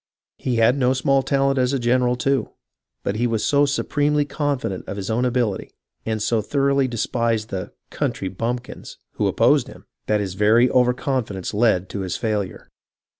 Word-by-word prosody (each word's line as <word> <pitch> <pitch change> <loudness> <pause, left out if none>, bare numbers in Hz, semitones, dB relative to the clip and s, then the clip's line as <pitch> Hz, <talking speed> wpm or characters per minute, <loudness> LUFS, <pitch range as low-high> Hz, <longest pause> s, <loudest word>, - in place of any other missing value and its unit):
He 125 - -1
had 115 +4 +3
no 130 0 +3
small 135 +1 +2
talent 135 0 +1
as 125 +1 +1
a - - +2
general, 125 0 +2
too, 135 +2 0 0.5
but 100 - -2
he 120 +2 +1
was 115 -2 -1
so 145 0 +3
supremely 145 +1 +1
confident 140 - -2
of 100 - -5
his 100 +2 -3
own 120 +3 +1
ability, 120 -5 -1 0.4
and 110 -1 -1
so 115 -1 +1
thoroughly 140 +3 +1
despised 115 -2 -1
the 95 -2 -5
" - - -53
country 95 - -2
bumpkins 120 +6 -5
" - - -61
who - - +1
opposed - - +3
him, - - -13 0.2
that 105 0 +2
his 100 -3 -3
very 110 +5 +4
over 125 -1 +3
confidence 125 - -3
led 105 -4 +2
to 100 - -5
his 95 -2 -3
failure. 105 -4 -3
120 Hz, 180 wpm, -22 LUFS, 105-135 Hz, 0.5 s, very